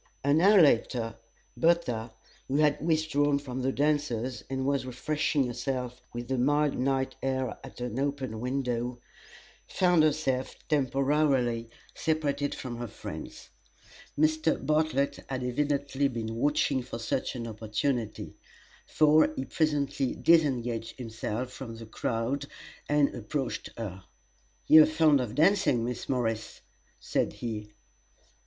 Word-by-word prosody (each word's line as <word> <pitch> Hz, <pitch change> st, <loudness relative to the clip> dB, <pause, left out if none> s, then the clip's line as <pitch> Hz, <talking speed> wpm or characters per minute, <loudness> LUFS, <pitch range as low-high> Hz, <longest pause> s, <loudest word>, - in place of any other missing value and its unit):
An 145 Hz, +3 st, +3 dB
hour 200 Hz, +2 st, +7 dB
later 120 Hz, -6 st, +3 dB, 0.4 s
Bertha, 125 Hz, -10 st, +1 dB, 0.4 s
who 135 Hz, -, -2 dB
had 150 Hz, 0 st, +2 dB
withdrawn 155 Hz, -3 st, +2 dB
from 130 Hz, -2 st, -5 dB
the 130 Hz, +1 st, +1 dB
dancers 140 Hz, -4 st, 0 dB
and 130 Hz, 0 st, -2 dB
was 140 Hz, -1 st, +1 dB
refreshing 145 Hz, +2 st, 0 dB
herself 125 Hz, 0 st, -3 dB
with 120 Hz, 0 st, -6 dB
the 130 Hz, -1 st, -1 dB
mild 145 Hz, +3 st, +2 dB
night 130 Hz, +1 st, 0 dB
air 130 Hz, -2 st, -1 dB
at -, -, -11 dB
an 125 Hz, 0 st, -3 dB
open 135 Hz, -5 st, -2 dB
window, 125 Hz, -1 st, -2 dB, 0.7 s
found 180 Hz, -3 st, +3 dB
herself 150 Hz, -4 st, 0 dB
temporarily 135 Hz, -4 st, +1 dB, 0.2 s
separated 145 Hz, -3 st, -1 dB
from 120 Hz, -3 st, -6 dB
her 120 Hz, 0 st, -4 dB
friends. -, -, -9 dB, 0.7 s
Mr. 155 Hz, -1 st, +2 dB
Bartlett 150 Hz, -2 st, +1 dB
had 130 Hz, -1 st, -3 dB
evidently 140 Hz, +1 st, 0 dB
been 115 Hz, -4 st, -4 dB
watching 140 Hz, +2 st, +1 dB
for 120 Hz, -, -7 dB
such 115 Hz, +3 st, -2 dB
an 120 Hz, -2 st, -4 dB
opportunity, 110 Hz, +1 st, -3 dB, 0.5 s
for 155 Hz, 0 st, +4 dB
he 130 Hz, -, -3 dB
presently 145 Hz, -4 st, 0 dB
disengaged 120 Hz, -8 st, +2 dB
himself 120 Hz, +1 st, -4 dB
from 120 Hz, -4 st, -7 dB
the 115 Hz, 0 st, -9 dB
crowd 115 Hz, +5 st, -2 dB, 0.4 s
and 145 Hz, -1 st, +3 dB
approached 130 Hz, +3 st, -4 dB
her. 95 Hz, -5 st, -6 dB, 0.6 s
"You 155 Hz, -, +9 dB
are -, -, +8 dB
fond 155 Hz, -3 st, +4 dB
of 115 Hz, -4 st, -4 dB
dancing, 155 Hz, -, +3 dB
Miss 125 Hz, -1 st, -5 dB
Morris?" 115 Hz, -4 st, -2 dB, 0.4 s
said -, -, -1 dB
he. 105 Hz, -3 st, -6 dB
135 Hz, 125 wpm, -29 LUFS, 120-150 Hz, 0.7 s, You